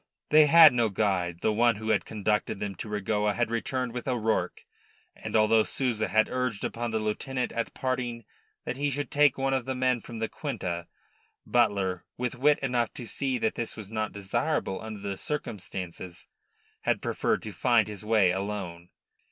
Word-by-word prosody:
They 155 0 +7
had 160 -2 +9
no 120 -2 +2
guide. 90 -4 0
The 110 - +2
one 115 +1 +3
who 110 +1 -5
had 110 -2 +2
conducted 105 -1 -1
them 100 -1 -3
to 110 - -6
Regoa 105 0 0
had 120 -2 0
returned 125 +1 -2
with 125 +1 -5
O'Rourke, 115 -4 -1 0.5
and - - -6
although 110 +1 +5
Souza 120 -4 0
had 110 0 +3
urged 125 -4 -2
upon 120 0 -3
the 110 - -1
lieutenant 125 +4 -2
at 115 - -3
parting 125 -3 -2 0.4
that 120 - -3
he 145 +1 0
should 145 +1 -3
take 145 -2 +4
one 135 0 0
of 130 -3 0
the 130 0 -2
men 125 -2 +1
from 115 - -9
the 110 0 -1
quinta, 85 -5 -4 0.6
Butler, 100 -7 +1
with 125 -1 -2
wit 145 +4 +3
enough 125 -3 0
to 120 - -6
see 130 +2 -2
that 110 - 0
this 115 - -4
was 105 -1 -8
not 110 -1 -2
desirable 100 +2 -2
under 110 -2 -7
the 100 -1 -3
circumstances, 95 - -5 0.6
had - - 0
preferred - - 0
to 110 - -6
find 115 +3 +3
his 105 -2 -7
way 105 -4 +4
alone. 95 -3 -4
110 Hz, 180 wpm, -28 LUFS, 105-125 Hz, 0.6 s, had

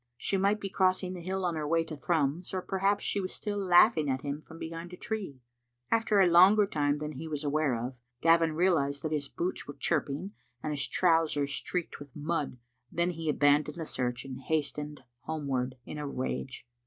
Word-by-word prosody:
She 195 - -1
might 200 +2 +2
be 200 - -3
crossing 185 -1 +1
the 180 - -7
hill 190 +2 -2
on 175 - +1
her 155 -2 -3
way 165 +1 +2
to 160 -1 -7
Thrums, 160 +3 0
or 185 - -2
perhaps 195 +1 +1
she 200 - +1
was 185 - -4
still 205 -1 -3
laughing 175 -3 +5
at 130 0 -1
him 145 +1 -3
from 160 - -13
behind 165 +2 -6
a - - -8
tree. 195 - -5 0.5
After 225 -2 +3
a 190 - +6
longef 195 +4 +6
time 145 -1 +1
than 150 0 -4
he 155 +3 -7
was 150 -1 -4
aware 145 -2 +1
of, 120 +1 -5 0.2
Gavin 165 +1 +4
realised 155 -5 +1
that 155 - -2
his 145 -2 -1
boots 180 +2 -3
were 145 - -7
chirping 155 +3 -1 0.3
and 155 - -1
his 140 -2 -1
trousers 160 -5 +2
streaked 180 +2 -3
with 145 -2 -12
mud. 150 -3 -2 0.3
Then 170 +1 +1
he 165 -2 -4
abandoned 145 +2 +3
the 165 - -4
search 125 -3 -2
and 135 0 -7
hastened 150 -1 -2 0.2
homewards 135 -5 -2
in 150 - -6
a 145 - -3
rage. 130 -1 -4
160 Hz, 200 wpm, -30 LUFS, 145-180 Hz, 0.5 s, a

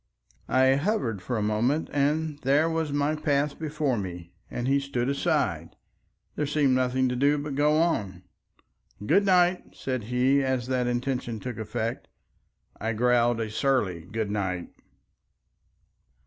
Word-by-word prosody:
I 130 +1 +4
hovered 140 - -1
for 120 +6 -3
a 105 - -1
moment 120 +9 +1
and 150 +1 0
there 145 +4 +3
was 160 -2 -1
my 145 +1 +1
path 145 -2 0
before 150 -6 -1
me, 90 -3 -7 0.2
and 120 +1 -3
he 140 +1 +3
stood 125 -3 -2
aside. 140 - -1 0.6
There 150 - -1
seemed 145 -2 +2
nothing 130 0 +1
to 125 - -2
do 140 +3 +3
but 145 0 -4
go 150 +2 +3
on. 100 - -1 0.8
"Good 200 - +3
night," 180 -1 +2
said 130 -5 -3
he, 125 +4 +2
as 130 -2 -1
that 125 -1 0
intention 120 -2 -2
took 120 0 -6
effect. 110 +1 -3 0.7
I 110 +2 -1
growled 120 0 +2
a 110 -2 -3
surly 110 -9 0
good 110 -2 -2
night. 95 -4 -2
130 Hz, 145 wpm, -26 LUFS, 115-145 Hz, 0.8 s, I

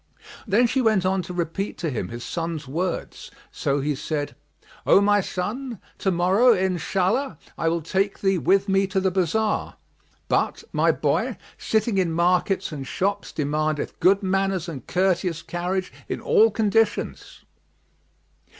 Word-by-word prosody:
Then 215 +5 +4
she 255 +3 +1
went 215 -6 +2
on 190 0 +1
to 180 - -8
repeat 175 +3 -3
to 165 -3 -2
him 125 - -3
his 120 +1 -7
son's 165 -4 -4
words; 170 +6 -3 0.2
so 140 0 -1
he 150 +2 0
said, 145 +1 -3 0.5
"O - - +6
my 205 0 +4
son, 220 +6 -4 0.2
to 195 - +1
morrow, 190 +7 +4
Inshallah! 190 - 0 0.2
I 165 - -1
will 165 -1 -1
take 195 +5 0
thee 195 -2 +2
with 195 +5 +3
me 195 0 +2
to 190 0 0
the 190 0 +1
bazar; 195 +4 0 0.5
but, - - 0
my - - +4
boy, - - 0 0.2
sitting 220 -2 +1
in 170 -3 +1
markets 180 +3 +1
and 140 -3 -6
shops 200 +2 -2
demandeth 150 0 -2
good 195 +2 +4
manners 195 -2 0
and 140 -8 -7
courteous 180 -2 0
carriage 175 +3 -3 0.2
in - - -2
all 450 -1 +4
conditions." 225 0 0
185 Hz, 150 wpm, -24 LUFS, 165-200 Hz, 0.5 s, O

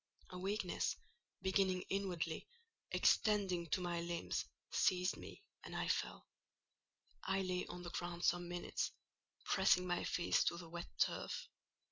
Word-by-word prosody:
A 180 - -5
weakness, 195 0 0 0.5
beginning 190 -1 +2
inwardly, 180 -5 -1 0.4
extending 195 -5 +3
to 185 - +1
the 175 -1 -1
limbs, 170 0 -1 0.3
seized 180 -1 +3
me, - - -10 0.2
and - - -7
I - - 0
fell: - - -1 1.0
I 195 0 +1
lay 180 -1 -1
on 175 0 -7
the 175 - -5
ground 175 0 -2
some 175 0 +2
minutes, 175 0 -2 0.5
pressing 180 - +4
my 175 -1 0
face 175 - +2
to 170 - +1
the 170 -1 -8
wet 175 +1 -5
turf. - - 0
180 Hz, 135 wpm, -39 LUFS, 175-190 Hz, 1.0 s, pressing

